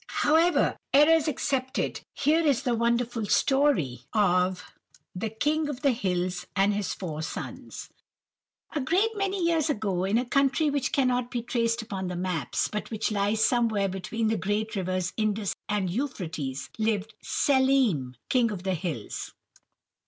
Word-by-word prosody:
"However, 325 +4 +3 0.2
errors 310 +2 +6
excepted, 260 -2 -1
here 310 +3 +3
is 285 -5 +2
the 250 -3 +1
wonderful 235 -1 0
story 265 - +2
of 180 -3 +2 0.5
'The 205 +5 -3
King 295 +7 0
of 280 0 -6
the 280 - +5
Hills 180 -5 -2
and 200 +1 +3
his 205 -1 -2
Four 155 -5 -5
Sons.' 160 - -6 0.8
"A 295 - -2
great 365 +11 +2
many 395 -2 -1
years 325 -2 +2
ago, 205 -9 -1
in 200 +4 +2
a 250 - 0
country 275 +4 +2
which 280 -2 -1
cannot 250 -3 +1
be 240 -2 -3
traced 230 -1 0
upon 190 -3 -4
the 180 - -4
maps, 180 -3 -1
but 210 - -5
which 220 -1 -2
lies 210 +1 +2
somewhere 220 -5 +2
between 195 +5 -3
the 220 - +1
great 210 +4 -2
rivers 185 -1 -1
Indus 215 -2 0 0.2
and 205 -2 0
Euphrates, 170 - -4
lived 220 -1 0
Schelim, 260 - +2
King 245 -3 +3
of 195 -4 -5
the 190 -1 0
Hills. 160 - -5
220 Hz, 150 wpm, -27 LUFS, 190-270 Hz, 0.8 s, errors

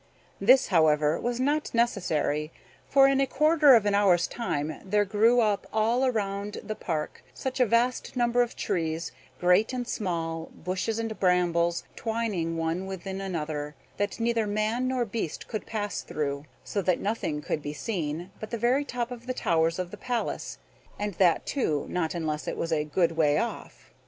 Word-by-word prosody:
This, 255 +7 +5
however, 155 -3 +3
was 240 0 -2
not 290 +1 0
necessary, 160 -9 0 0.4
for 270 0 +6
in 275 0 +3
a 270 - +2
quarter 300 -1 +5
of 220 -3 +3
an 205 - +2
hour's 190 -4 +4
time 155 -10 -3
there 205 +1 +2
grew 225 +5 +4
up 210 -3 0
all 235 +4 +2
round 205 -2 -2
about - - -9
the 215 - -1
park 160 -7 -4
such 265 0 -4
a 250 - +4
vast 240 +5 +1
number 240 0 +3
of 240 - -1
trees, 165 -1 -2 0.3
great 180 +7 +3
and 245 -1 -3
small, 165 -6 -3
bushes 185 +5 -2
and 225 -1 -3
brambles, 175 -2 +2
twining 215 -8 -2
one 165 +3 -2
within 190 0 -5
another, 150 -5 -4 0.2
that 205 +2 -2
neither 230 -1 +1
man 215 +4 0
nor 255 -2 0
beast 210 -7 -4
could 215 - -5
pass 205 -2 -3
through; 140 -1 -3 0.2
so 200 - -2
that 185 -1 +1
nothing 200 -8 -2
could 150 +1 -3
be 145 - -4
seen 170 0 -4
but 215 - -6
the 235 - -3
very 245 +5 +2
top 245 -3 -3
of 240 0 -8
the 255 - -2
towers 165 -4 +1
of 180 -1 -4
the - - -8
palace; 245 -2 -3 0.4
and 205 0 -2
that, 180 -3 +4
too, 155 - 0
not 175 -2 -1
unless 155 -2 -3
it - - -3
was 165 0 -1
a 150 -1 +1
good 165 +3 +1
way 155 -3 +2
off. - - -5
200 Hz, 180 wpm, -27 LUFS, 165-235 Hz, 0.4 s, for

